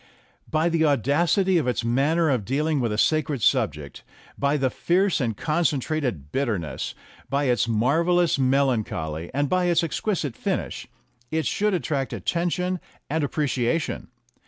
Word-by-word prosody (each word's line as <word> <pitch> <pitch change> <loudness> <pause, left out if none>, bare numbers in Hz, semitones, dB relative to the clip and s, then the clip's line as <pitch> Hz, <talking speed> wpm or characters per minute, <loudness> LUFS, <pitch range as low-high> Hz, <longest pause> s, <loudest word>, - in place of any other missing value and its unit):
By 155 +2 +1
the 165 -1 +2
audacity 160 - +2
of 140 - -2
its 125 -1 -1
manner 145 +7 +2
of 125 -6 0
dealing 150 +6 0
with 120 -3 0
a 105 - -2
sacred 150 -1 +1
subject, 75 - 0 0.3
by 140 +1 +1
its 135 -3 0
fierce 185 -1 +1
and 115 -5 -1
concentrated 145 - -1
bitterness, 105 - -2 0.3
by 140 +1 +1
its 125 -3 +2
marvellous 160 +9 +2
melancholy, 115 - 0
and 145 +2 0
by 185 +3 +1
its 175 -1 +3
exquisite 165 - -2
finish, - - -3 0.4
it 160 0 -1
should 210 -1 +1
attract 140 -6 -2
attention 180 +1 -1 0.3
and 160 0 0
ap 145 - -1
preciation. 140 0 -1
145 Hz, 140 wpm, -24 LUFS, 125-165 Hz, 0.4 s, its